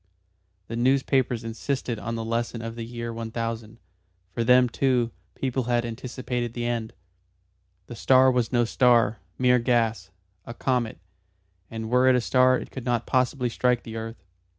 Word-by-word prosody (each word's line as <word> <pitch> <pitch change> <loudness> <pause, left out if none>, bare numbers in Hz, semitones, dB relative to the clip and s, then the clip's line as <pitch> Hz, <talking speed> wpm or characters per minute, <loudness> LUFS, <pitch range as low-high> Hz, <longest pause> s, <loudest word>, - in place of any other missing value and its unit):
The 115 - -5
newspapers 130 -1 +1
insisted 120 +1 -3
on 115 +3 -4
the 115 -1 -4
lesson 115 0 -2
of 115 0 -5
the 115 0 -6
year 115 0 -5
1000 115 -1 -5 0.5
for 115 - -2
then, 125 +1 +5
too, 125 -1 +1 0.2
people 130 -2 -2
had 120 -1 +1
anticipated 120 0 -4
the 120 -1 -3
end. 115 -2 -2 0.9
The 120 - -9
star 130 +3 +5
was 125 -3 0
no 120 -2 +3
star 115 -3 +3 0.2
mere 125 -1 +4
gas 115 -5 0 0.3
a 115 - -9
comet; 125 -3 -1 0.7
and 110 0 -6
were 125 +1 +4
it 130 - +6
a 125 - +2
star 130 +1 +4
it - - -8
could 130 - -7
not 120 -2 0
possibly 130 0 +1
strike 125 0 +1
the 115 - -8
earth. 115 +1 -7
120 Hz, 160 wpm, -25 LUFS, 115-125 Hz, 0.9 s, it